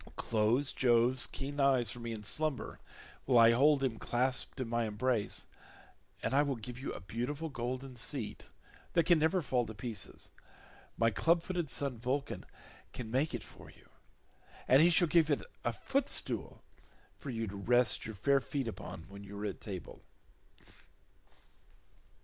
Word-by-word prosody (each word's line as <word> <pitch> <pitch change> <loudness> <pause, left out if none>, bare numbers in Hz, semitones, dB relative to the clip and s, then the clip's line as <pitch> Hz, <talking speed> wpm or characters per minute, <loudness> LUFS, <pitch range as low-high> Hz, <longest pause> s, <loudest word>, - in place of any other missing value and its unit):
Close 115 +5 +1
Jove's 125 +1 +3
keen 145 +2 -5
eyes 130 -5 +3
for 120 - -7
me 115 0 -5
in 110 -2 -6
slumber 155 +5 +1 0.5
while 130 -2 +4
I 115 0 +8
hold 140 +3 +4
him 120 -4 -1
clasped 125 +2 -1
in 130 - -2
my 115 0 0
embrace, 110 0 -1 0.8
and 115 - -1
I 140 - +5
will 140 -2 0
give 120 +2 -8
you 135 - -4
a - - -6
beautiful 125 - -4
golden 130 0 -4
seat, 125 -2 -2 0.5
that 170 -2 +3
can 170 -2 +5
never 160 +3 +2
fall 125 -2 +1
to 110 - -7
pieces; 105 -2 -5 0.7
my 115 0 +3
clubfooted 170 - +1
son 135 -5 -1
Vulcan 135 +4 -2 0.5
shall 125 - -5
make 130 +5 0
it 120 - -5
for - - -13
you, - - -19 0.8
and 130 +3 +7
he 170 - +7
shall 175 0 +4
give 160 0 +4
it 145 - +1 0.2
a 120 - +1
footstool 270 - -2 0.6
for 140 - -7
you 115 -2 -2
to 100 -1 -7
rest 120 +4 +3
your 110 - -6
fair 140 +8 +3
feet 135 -1 -3
upon 80 -6 -7
when 100 +1 -10
you 100 0 -8
are 105 - -3
at 100 - -4
table." 95 -5 -7
125 Hz, 160 wpm, -33 LUFS, 115-140 Hz, 0.8 s, I